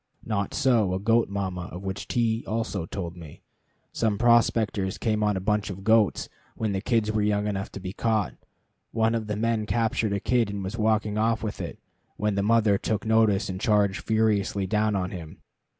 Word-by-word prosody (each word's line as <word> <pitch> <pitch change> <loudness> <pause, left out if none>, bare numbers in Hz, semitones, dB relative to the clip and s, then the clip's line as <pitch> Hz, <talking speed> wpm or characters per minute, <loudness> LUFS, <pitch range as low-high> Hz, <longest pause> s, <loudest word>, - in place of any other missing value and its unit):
Not 100 -3 -2
so 115 -9 +2
a - - -2
goat 115 +2 +2
mama 95 -3 -3
of 90 +2 -8
which 95 0 -5
T 115 -1 0
also 110 -6 -2
told 90 -3 -5
me. 80 -4 -12 0.5
Some 110 -3 0
prospectors 115 -4 +2
came 110 -2 0
on 105 -2 +1
a - - 0
bunch 105 +2 0
of 95 0 -7
goats 110 -1 +3 0.3
when 110 -2 -1
the 95 -1 -2
kids 110 -2 +1
were 110 0 0
young 105 0 +1
enough 100 -2 -3
to - - -6
be 95 0 -6
caught. 110 -2 0 0.6
One 115 0 +1
of 115 -2 -2
the 105 - -2
men 110 0 0
captured 110 -2 0
a 100 - 0
kid, 120 0 +1
and 100 -1 -4
was 95 +4 -4
walking 110 -1 +1
off 115 +1 +1
with 105 -2 -4
it, - - -6 0.4
when 105 0 0
the 100 - 0
mother 105 -1 +3
took 105 -1 -2
notice 110 -2 +3
and 95 0 -5
charged 105 -3 +2
furiously 105 -3 +1
down 105 +2 +1
on 90 -1 -2
him. 85 -5 -8
105 Hz, 200 wpm, -26 LUFS, 100-110 Hz, 0.6 s, goats